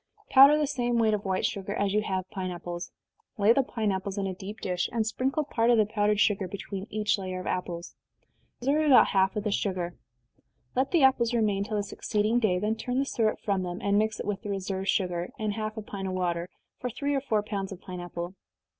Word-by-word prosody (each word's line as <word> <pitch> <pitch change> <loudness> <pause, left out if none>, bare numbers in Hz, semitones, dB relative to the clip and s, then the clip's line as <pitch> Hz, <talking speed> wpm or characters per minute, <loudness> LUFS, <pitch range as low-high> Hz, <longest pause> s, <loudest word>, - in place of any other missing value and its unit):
Powder 275 +3 +9
the 305 - +2
same 245 -4 0
weight 220 -2 +3
of 210 -1 -2
white 190 -1 0
sugar 200 +1 -2
as 200 -1 0
you 210 - +3
have 190 -3 -2
pine 185 -1 -3
apples 175 0 -6 0.5
lay 210 +2 +5
the 275 - +3
pine 220 -5 -1
apples 190 +1 -3
in 200 - -1
a 190 - -2
deep 200 +4 -8
dish, 180 -1 -1
and 225 -1 0
sprinkle 265 +7 0
part 235 -5 +1
of 240 - +5
the 215 - +5
powdered 210 -1 +1
sugar 205 -3 +2
between 195 +1 -6
each 215 -1 0
layer 185 -1 -4
of 185 - -7
apples. 175 -1 -3 0.7
Reserve 295 +5 +2
about 270 - +7
half 190 0 +2
of 210 - -2
the 210 - -1
sugar. 185 -4 -1 0.8
Let 265 +2 +2
the 335 -5 +3
apples 240 -3 +4
remain 205 -4 +1
till 215 +1 -3
the 205 - 0
succeeding 215 +3 0
day 205 -6 +2
then 210 +4 -1
turn 250 +3 -2
the 275 - +2
syrup 220 -5 0
from 195 -2 0
them, 175 -1 -4
and 200 0 +2
mix 220 0 0
it - - -4
with 200 -2 -2
the 210 - -6
reserved 195 -1 -3
sugar, 180 -3 0
and 215 -1 -1
half 215 +1 -4
a 220 - -4
pint 195 -2 -5
of 185 - -3
water, 175 -1 -1 0.3
for 250 - -3
three 285 +5 -2
or 275 - +1
four 220 -6 0
pounds 200 -2 -4
of 190 - -7
pine 180 -2 -7
apple. 175 0 -5
205 Hz, 235 wpm, -28 LUFS, 190-225 Hz, 0.8 s, Powder